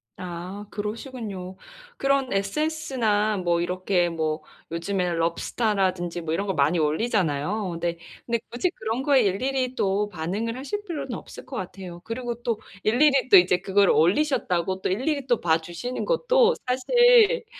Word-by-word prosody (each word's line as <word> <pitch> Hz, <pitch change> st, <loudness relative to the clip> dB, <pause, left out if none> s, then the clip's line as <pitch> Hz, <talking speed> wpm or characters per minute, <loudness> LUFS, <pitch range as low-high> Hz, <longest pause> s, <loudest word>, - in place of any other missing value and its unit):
아, 185 Hz, +3 st, -7 dB
그러시군요. 210 Hz, -4 st, -6 dB, 0.4 s
그런 275 Hz, -3 st, +1 dB
SNS나 220 Hz, -2 st, 0 dB
뭐 170 Hz, -2 st, +1 dB
이렇게 180 Hz, 0 st, 0 dB
뭐 155 Hz, -1 st, -2 dB, 0.3 s
요즘에는 175 Hz, 0 st, -1 dB
럽스타라든지 175 Hz, 0 st, 0 dB
뭐 160 Hz, 0 st, -3 dB
이런 200 Hz, +4 st, -1 dB
거 190 Hz, -, 0 dB
많이 155 Hz, +2 st, +2 dB
올리잖아요. 180 Hz, +2 st, 0 dB
근데, 170 Hz, 0 st, -2 dB, 0.3 s
근데 235 Hz, -1 st, 0 dB
굳이 340 Hz, +9 st, 0 dB
그런 225 Hz, -1 st, -3 dB
거에 275 Hz, -2 st, +4 dB
일일이 255 Hz, +6 st, 0 dB
또 205 Hz, 0 st, 0 dB
반응을 205 Hz, +8 st, -3 dB
하실 410 Hz, +10 st, -4 dB
필요는 280 Hz, -7 st, -4 dB
없을 -, -, -9 dB
것 -, -, -8 dB
같아요. 180 Hz, -2 st, -7 dB
그리고 240 Hz, 0 st, -5 dB
또 230 Hz, -3 st, -1 dB, 0.2 s
일일이 270 Hz, +4 st, +3 dB
또 195 Hz, -, +9 dB
이제 180 Hz, 0 st, +5 dB
그걸 195 Hz, +1 st, +2 dB
올리셨다고 185 Hz, -, +1 dB
또 -, -, -1 dB
일일이 270 Hz, +8 st, -1 dB
또 240 Hz, -3 st, +3 dB
봐 165 Hz, -1 st, +2 dB
주시는 175 Hz, +10 st, -5 dB
것도 -, -, +3 dB
사실 480 Hz, -, +4 dB
205 Hz, 325 characters per minute, -25 LUFS, 175-255 Hz, 0.4 s, 또